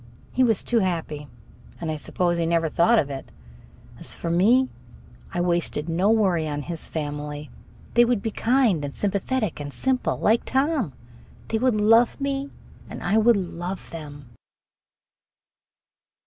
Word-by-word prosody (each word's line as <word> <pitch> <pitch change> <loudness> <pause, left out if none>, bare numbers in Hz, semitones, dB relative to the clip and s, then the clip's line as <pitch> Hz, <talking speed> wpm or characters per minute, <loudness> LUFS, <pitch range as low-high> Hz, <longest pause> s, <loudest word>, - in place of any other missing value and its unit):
He 255 - +3
was 225 -4 +3
too 235 - +2
happy, 165 -6 -2 0.5
and 165 -2 -3
I - - -2
suppose 175 +3 -1
he 165 - +1
never 165 -1 +1
thought 225 +10 +4
of 145 -8 +1
it. 135 -1 -7 0.7
As - - 0
for 170 - -3
me, 230 +10 +4 0.6
I 175 - -3
wasted 170 -3 0
no 175 +5 +1
worry 190 -8 +2
on 145 -1 -3
his 170 0 -6
family. 150 -1 -5 0.4
They 240 - +6
would 235 -4 +1
be 225 - -1
kind 230 - +2
and 140 -1 -6
sympathetic 205 0 -1
and 145 -1 -5
simple, 260 - 0
like 225 +2 +2
Tom. 265 - 0 0.6
They 220 - 0
would 245 -3 +2
love 225 +3 +4
me 275 0 -2 0.4
and - - -7
I 215 +3 +3
would 230 0 +5
love 180 0 -5
them. 145 -5 -9
185 Hz, 150 wpm, -24 LUFS, 160-235 Hz, 0.7 s, They